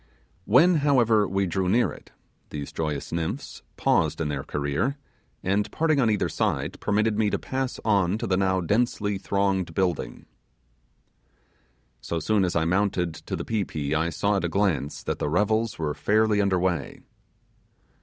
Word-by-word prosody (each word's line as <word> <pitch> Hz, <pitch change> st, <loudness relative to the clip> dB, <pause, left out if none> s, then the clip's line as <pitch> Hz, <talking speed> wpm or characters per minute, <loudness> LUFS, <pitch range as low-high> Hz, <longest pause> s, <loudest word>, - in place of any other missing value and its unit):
When 165 Hz, -, +5 dB
however 120 Hz, -8 st, +3 dB
we 95 Hz, +1 st, 0 dB
drew 95 Hz, +1 st, -1 dB
near 120 Hz, +5 st, +3 dB
it -, -, -13 dB, 0.4 s
these 70 Hz, -2 st, -6 dB
joyous 75 Hz, -3 st, -3 dB
nymphs 80 Hz, -1 st, -4 dB, 0.2 s
paused -, -, +1 dB
in 80 Hz, -2 st, -1 dB
their 70 Hz, -2 st, -2 dB
career, 75 Hz, -, -1 dB, 0.5 s
and 100 Hz, +2 st, 0 dB
parting 155 Hz, -2 st, +1 dB
on 115 Hz, -, +3 dB
either 105 Hz, -2 st, +1 dB
side, -, -, -2 dB
permitted 110 Hz, +1 st, +1 dB
me 105 Hz, -2 st, +3 dB
to -, -, 0 dB
pass 130 Hz, -1 st, -3 dB
on 100 Hz, -3 st, +2 dB
to -, -, -4 dB
the 95 Hz, -, +1 dB
now 95 Hz, -1 st, +1 dB
densely 105 Hz, +1 st, 0 dB
thronged 95 Hz, -4 st, 0 dB
building. 90 Hz, -2 st, -1 dB, 1.8 s
So 85 Hz, +7 st, -3 dB
soon 100 Hz, +5 st, +1 dB
as 90 Hz, -, -2 dB
I 80 Hz, -1 st, +2 dB
mounted 90 Hz, -2 st, +1 dB
to -, -, -6 dB
the -, -, -5 dB
pi 110 Hz, -3 st, 0 dB
pi 75 Hz, -4 st, -3 dB
I -, -, -1 dB
saw 100 Hz, +5 st, 0 dB
at 95 Hz, -, -2 dB
a 85 Hz, -, 0 dB
glance 80 Hz, -7 st, 0 dB
that -, -, -3 dB
the 75 Hz, -, -1 dB
revels 110 Hz, +6 st, +1 dB
were 75 Hz, -2 st, -2 dB
fairly 105 Hz, +2 st, +2 dB
under 100 Hz, -2 st, +2 dB
way. 90 Hz, -5 st, -2 dB
100 Hz, 165 wpm, -25 LUFS, 85-110 Hz, 1.8 s, When